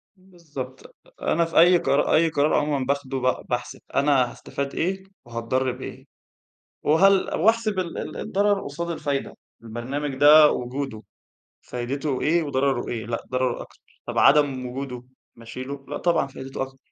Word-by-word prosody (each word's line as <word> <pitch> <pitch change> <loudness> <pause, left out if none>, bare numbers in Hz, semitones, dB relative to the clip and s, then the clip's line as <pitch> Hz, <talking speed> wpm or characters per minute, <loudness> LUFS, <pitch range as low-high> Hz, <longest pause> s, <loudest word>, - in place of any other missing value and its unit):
بالضبط، 160 -9 -10 0.3
أنا 170 +1 +2
في 165 - +2
أي 175 +1 +7
قر 140 -2 +1
أي 165 +1 +4
قرار 150 0 +1
عمومًا 145 -3 +1
باخُده، 140 -1 -2
ب 130 0 0
باحسب 120 0 -3 0.2
أنا 135 -3 +3
هاستفاد 140 0 -5
إيه 190 +3 -1 0.2
وهاتضرّ 120 +2 -1
بإيه. - - -9 0.8
وهل 190 +5 +4
وأحسب 215 +1 +2
ال 175 -2 -3
ال - - -5
الضرَر 200 0 +1
قُصاد 170 +4 -5
الفايدة. 145 -4 -3 0.3
البرنامج 130 +5 -4
ده 150 +2 +8
وجوده، 125 -2 -4 0.6
فايدته 130 +3 -3
إيه 170 +2 +2
وضرَره 135 -3 0
إيه؟ 115 -3 -4
لأ، 115 0 -3
ضرَره 130 -1 0
أكتر. - - -17 0.2
طب - - -3
عدم 140 -3 +4
وجوده، 125 -1 -6 0.3
ما 115 - -15
اشيله؟ 135 +4 -7
لأ، - - -4
طبعًا 170 -4 +2
فايدته 135 0 -6
أكتر. 135 0 -7
140 Hz, 150 wpm, -24 LUFS, 130-160 Hz, 0.8 s, ده